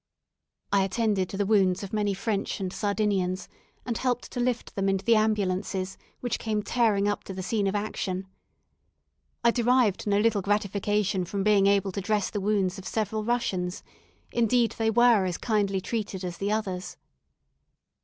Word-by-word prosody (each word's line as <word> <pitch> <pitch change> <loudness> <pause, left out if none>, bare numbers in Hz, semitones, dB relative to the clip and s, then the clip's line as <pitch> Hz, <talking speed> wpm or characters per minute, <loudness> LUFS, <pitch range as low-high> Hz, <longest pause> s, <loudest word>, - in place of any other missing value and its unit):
I 200 -1 +4
attended 195 -2 0
to 195 - -5
the 205 - +1
wounds 195 -2 +3
of 200 - -7
many 205 -2 0
French 200 0 -2
and 190 -1 -3
Sardinians, 200 -3 0 0.4
and 235 -2 -2
helped 250 -1 -1
to - - -4
lift 245 -1 -1
them 195 0 0
into 195 0 -1
the 235 - +5
ambulances, 195 -3 0 0.3
which 245 - -2
came 215 -2 -1
tearing 210 -4 +2
up 205 - -1
to 190 - -7
the 185 - -4
scene 205 0 0
of 195 - -1
action. 195 -2 -2 1.2
I 235 - +5
derived 240 -4 +2
no 200 0 +3
little 215 -2 +2
gratification 205 -1 0
from 195 +3 -3
being 205 -1 +4
able 200 -1 +2
to 200 - -4
dress 210 0 0
the 205 - -2
wounds 195 -2 0
of 190 - -8
several 215 0 -1
Russians; 205 -6 -1 0.5
indeed, 235 0 +2
they 225 0 +2
were 235 -3 +5
as 180 -2 -2
kindly 205 -4 0
treated 200 -2 -4
as 175 -1 -5
the 200 +1 -1
others. 190 -4 -3
205 Hz, 170 wpm, -27 LUFS, 195-220 Hz, 1.2 s, the